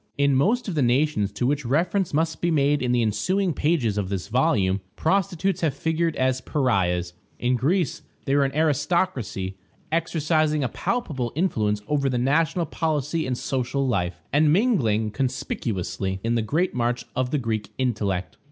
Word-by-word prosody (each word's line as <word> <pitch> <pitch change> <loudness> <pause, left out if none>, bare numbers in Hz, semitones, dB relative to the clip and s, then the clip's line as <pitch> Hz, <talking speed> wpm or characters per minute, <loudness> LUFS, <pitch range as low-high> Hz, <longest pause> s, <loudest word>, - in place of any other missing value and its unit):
In 140 0 +3
most 215 - +2
of 190 - -2
the 150 - +1
nations 125 -4 +2
to 120 - -1
which 145 +2 +1
reference 170 - +1
must 160 +2 0
be 175 - +1
made 145 -2 +2
in 125 -1 0
the 120 -1 +2
ensuing 175 - 0
pages 135 -9 +1
of 95 -2 -3
this 100 0 -4
volume, 110 -7 +2
prostitutes 185 +1 0
have 155 -5 +1
figured 160 +2 0
as 130 0 +1
pariahs; 90 - 0 0.2
in 125 +1 +1
Greece 155 +5 0 0.2
they 135 - +1
were 145 - +4
an 135 0 -2
aristocracy, 145 - 0 0.3
exercising 155 -2 +1
a 125 - 0
palpable 145 - -2
influence 105 - 0
over 140 -2 +1
the 125 - 0
national 160 +7 +1
policy 155 0 -1
and 125 -1 -1
social 135 +2 -1
life, 90 -7 -1
and 150 +1 +4
mingling 125 - +2
conspicuously 100 -7 -2
in 115 +1 +1
the 115 - +2
great 155 - 0
march 120 0 -1
of 130 -1 0
the 150 - 0
Greek 115 -5 -2
intellect. 105 -8 -1
135 Hz, 165 wpm, -24 LUFS, 115-160 Hz, 0.3 s, were